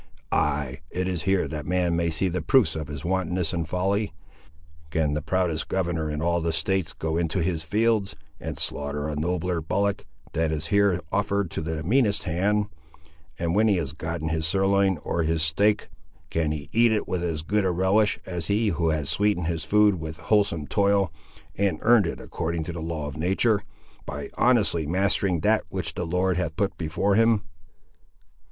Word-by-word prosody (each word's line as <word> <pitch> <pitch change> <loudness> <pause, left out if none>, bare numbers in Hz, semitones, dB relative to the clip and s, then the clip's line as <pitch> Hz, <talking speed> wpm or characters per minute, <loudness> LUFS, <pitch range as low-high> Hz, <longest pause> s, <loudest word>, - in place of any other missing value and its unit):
Ay, 70 -1 0
it 90 +1 -2
is 90 -3 -1
here 95 -1 +2
that 75 -1 -6
man 90 -1 +1
may 85 0 +1
see 80 +4 0
the 90 0 -2
proofs 130 - +3
of 80 -2 -4
his 75 0 -7
wantonness 90 -1 0
and 85 -2 -2
folly! 100 +4 0 0.8
Can 75 -2 0
the 75 - -1
proudest 90 -1 0
governor 85 -4 -1
in 75 +1 -3
all 85 0 +1
the 85 0 0
States 85 +2 0
go 80 0 -2
into 85 +1 0
his 85 -2 -1
fields, 105 +3 +1 0.2
and - - -5
slaughter 75 +1 -2
a 75 - -3
nobler 85 +2 -1
bullock 100 +5 -1 0.3
than 80 -1 0
is 80 0 -2
here 100 -4 +3
offered 100 -3 0
to - - -3
the 80 0 -3
meanest 105 - +2
hand; 100 +5 +1 0.7
and 85 0 -1
when 110 +3 +4
he 105 - +4
has 75 -5 -3
gotten 80 +1 -4
his 80 0 0
sirloin, 95 +1 +2
or 85 - -1
his 80 0 +1
steak, 100 +6 +2 0.4
can 80 -2 0
he 75 -2 -5
eat 115 0 +5
it 110 - 0
with 90 -1 -2
as 80 -3 -2
good 105 +5 +1
a 95 - +2
relish 95 +4 +2
as 85 -3 -3
he 105 +2 +2
who 85 -2 0
has 75 -3 -1
sweetened 105 -2 +1
his 80 -1 -1
food 105 -3 +4
with 80 0 -6
wholesome 100 -8 +1
toil, 100 +2 +2 0.4
and 100 -5 +1
earned 115 -5 +5
it - - -4
according 85 -1 -3
to 85 - -5
the 85 - -5
law 80 -2 -3
of 70 0 -6
natur', 95 +6 +2 0.5
by - - -5
honestly 105 -11 +2
mastering 95 0 +1
that 110 +4 +3
which 85 -4 -3
the 90 - -3
Lord 90 +1 +1
hath 85 -3 -2
put 100 +1 0
before 90 +5 0
him?" 115 0 +4
85 Hz, 185 wpm, -25 LUFS, 80-100 Hz, 0.8 s, eat